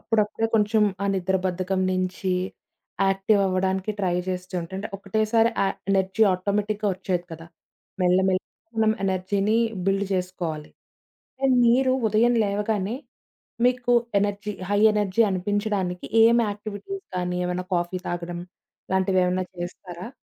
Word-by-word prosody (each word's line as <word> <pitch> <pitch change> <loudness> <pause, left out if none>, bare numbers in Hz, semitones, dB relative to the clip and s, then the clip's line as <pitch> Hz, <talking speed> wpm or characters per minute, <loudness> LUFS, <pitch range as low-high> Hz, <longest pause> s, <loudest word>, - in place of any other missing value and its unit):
అప్పుడప్పుడే 220 0 0
కొంచెం 215 0 +3 0.2
ఆ - - +1
నిద్ర 190 0 +1
బద్ధకం 185 +1 -1
నించి 185 0 -1 0.7
యాక్టివ్ 195 +2 +2
అవ్వడానికి 190 +2 0
ట్రై 180 -2 +1
జేస్తుంటే 180 -1 -4
అంటే 205 - -5
ఒకటేసారి 220 +3 +2
ఆ - - +2 0.2
ఎనర్జీ 190 +2 +2
ఆటోమేటిక్‌గా 205 +3 -1
వచ్చేయదు 180 -1 -2
కదా! 165 +1 -9 0.6
మెల్లమెల్లగా 185 +1 +3 0.3
మనం 220 -1 +4
ఎనర్జీని 195 +3 +1 0.3
బిల్డ్ 195 +1 +1
జేసుకోవాలి. 180 -5 -3 0.7
అండ్ 265 -2 +4
మీరు 255 +2 +4 0.2
ఉదయం 230 +3 +3
లేవగానే 205 +1 -1 0.7
మీకు 245 -1 +1 0.3
ఎనర్జీ 205 +1 -1 0.2
హై 205 0 +2
ఎనర్జీ 210 +1 +2
అనిపించడానికి 190 -1 -1 0.2
ఏం 230 +1 +6
యాక్టివిటీస్ 210 - -6
కానీ, 180 0 -1
ఏమన్నా 180 +1 -2
కాఫీ 175 +1 -1
తాగడం 175 0 -4 0.5
లాంటివేమన్నా 185 -1 +2
చేస్తారా? 175 +1 -7
195 Hz, 115 wpm, -24 LUFS, 185-210 Hz, 0.7 s, ఏం